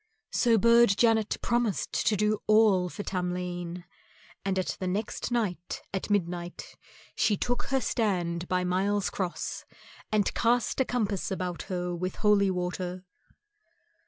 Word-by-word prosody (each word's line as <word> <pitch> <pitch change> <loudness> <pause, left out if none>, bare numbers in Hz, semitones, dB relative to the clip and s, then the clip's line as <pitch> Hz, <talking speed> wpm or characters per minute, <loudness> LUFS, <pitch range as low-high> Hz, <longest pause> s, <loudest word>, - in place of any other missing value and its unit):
So 235 -2 +3
Burd 235 -1 +5
Janet 225 -2 +3
promised 235 -4 0
to 215 - +4
do 210 +1 +1
all 215 -4 +4
for 205 - -6
Tamlane, 180 -1 -3 0.6
and 190 -1 -1
next 190 +4 -2
night 205 -8 -2
at 190 - -3
midnight 175 -3 -2 0.4
she 205 - +2
took 245 +4 -1
her 270 -1 +1
stand 180 -8 -1
by 180 0 +1
Miles 195 +3 0
Cross 185 -3 -3 0.5
and 210 -2 +2
cast 240 +1 +1
a 265 - +3
compass 210 -8 -1
round 180 -2 -3
her 180 -1 -2
with 185 +1 -3
holy 205 -2 +3
water. 180 0 -3
195 Hz, 130 wpm, -28 LUFS, 180-220 Hz, 0.6 s, Burd